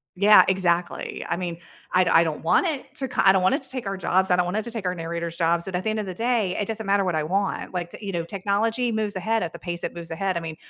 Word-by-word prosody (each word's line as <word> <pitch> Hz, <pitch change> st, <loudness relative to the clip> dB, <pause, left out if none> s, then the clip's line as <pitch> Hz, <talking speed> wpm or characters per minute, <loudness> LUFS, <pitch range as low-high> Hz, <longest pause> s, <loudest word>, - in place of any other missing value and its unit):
Yeah, 205 Hz, +3 st, +7 dB
exactly. 180 Hz, -2 st, 0 dB
I 170 Hz, -, -1 dB
mean, 175 Hz, -2 st, -4 dB, 0.3 s
I 185 Hz, -, +4 dB
d 175 Hz, -, 0 dB
I 165 Hz, -, +6 dB
don't 160 Hz, -2 st, -4 dB
want 165 Hz, -, +3 dB
it 300 Hz, -5 st, -4 dB
to 265 Hz, -, -1 dB
co -, -, 0 dB
I 190 Hz, -, +9 dB
don't 190 Hz, -, +2 dB
want 185 Hz, +8 st, +3 dB
it 280 Hz, -, -3 dB
to 265 Hz, -, +1 dB
take 255 Hz, -6 st, -4 dB
our 195 Hz, -1 st, -3 dB
jobs, 190 Hz, +1 st, +2 dB
I 180 Hz, -, +5 dB
don't 180 Hz, 0 st, +2 dB
want 180 Hz, +4 st, -2 dB
it 220 Hz, -, -1 dB
to 235 Hz, -, -6 dB
take 220 Hz, -5 st, -5 dB
our 180 Hz, -, 0 dB
narrator's 170 Hz, 0 st, -4 dB
jobs, 170 Hz, 0 st, +1 dB
but 190 Hz, -2 st, -4 dB
at 180 Hz, -, -2 dB
the 220 Hz, -, 0 dB
end 215 Hz, 0 st, -1 dB
of 210 Hz, -, -3 dB
the 185 Hz, -, -5 dB
day, 225 Hz, -2 st, 0 dB
it 205 Hz, -, -2 dB
doesn't 220 Hz, -1 st, -4 dB
matter 200 Hz, 0 st, +2 dB
what 180 Hz, -3 st, -1 dB
I 155 Hz, -, 0 dB
want, 195 Hz, +3 st, -2 dB
like, 175 Hz, -1 st, -3 dB
t -, -, -9 dB
you 200 Hz, -3 st, -5 dB
know, 170 Hz, -2 st, -2 dB
technology 215 Hz, +6 st, -1 dB
moves 215 Hz, -2 st, -1 dB
ahead 220 Hz, +4 st, 0 dB
at 170 Hz, -2 st, -3 dB
the -, -, -9 dB
pace 175 Hz, -1 st, -5 dB
it -, -, -4 dB
moves 170 Hz, -1 st, -7 dB
ahead, 185 Hz, +1 st, -1 dB
I -, -, 0 dB
mean, 165 Hz, -1 st, -6 dB
190 Hz, 320 wpm, -24 LUFS, 170-215 Hz, 0.3 s, I